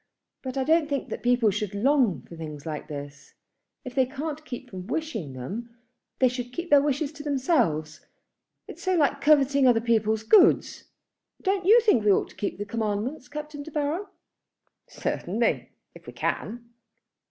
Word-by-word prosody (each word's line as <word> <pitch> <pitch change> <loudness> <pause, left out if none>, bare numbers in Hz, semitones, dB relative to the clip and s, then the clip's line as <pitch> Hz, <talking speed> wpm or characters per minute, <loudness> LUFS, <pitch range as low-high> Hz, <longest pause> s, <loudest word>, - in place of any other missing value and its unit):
But 260 0 -5
I 265 - +1
don't 315 +1 +3
think 280 -2 -2
that - - -5
people 245 -3 +3
should 210 0 -3
long 250 - +2
for 170 - -12
things 150 -3 -8
like 155 -2 -5
this. 145 -2 -9 0.5
If 255 - -6
they 260 -1 +2
can't 295 +3 -5
keep 250 -1 -8
from 185 -1 -7
wishing 235 - -3
them, 225 - -7 0.4
they 260 - +4
should 245 0 -4
keep 345 +6 -6
their 285 -1 +7
wishes 285 +1 -1
to 295 -1 -10
themselves. 255 - 0 0.6
It - - -9
is - - -14
so 370 -1 +1
like 285 -3 +2
coveting 280 -2 +4
other 240 -2 +5
people's 220 -2 +1
goods. 355 - +4 0.6
Don't 380 -1 0
you 450 +4 +8
think 415 - +3
we 210 - +5
ought - - +2
to - - -17
keep 205 - -3
the 205 - -4
commandments, 225 +6 -3
Captain 300 +1 -7
De 300 - -8
Baron?" 305 +6 -2 0.8
"Certainly - - -1 0.2
if - - -16
we - - -8
can." 235 +2 -3
255 Hz, 175 wpm, -26 LUFS, 210-295 Hz, 0.8 s, you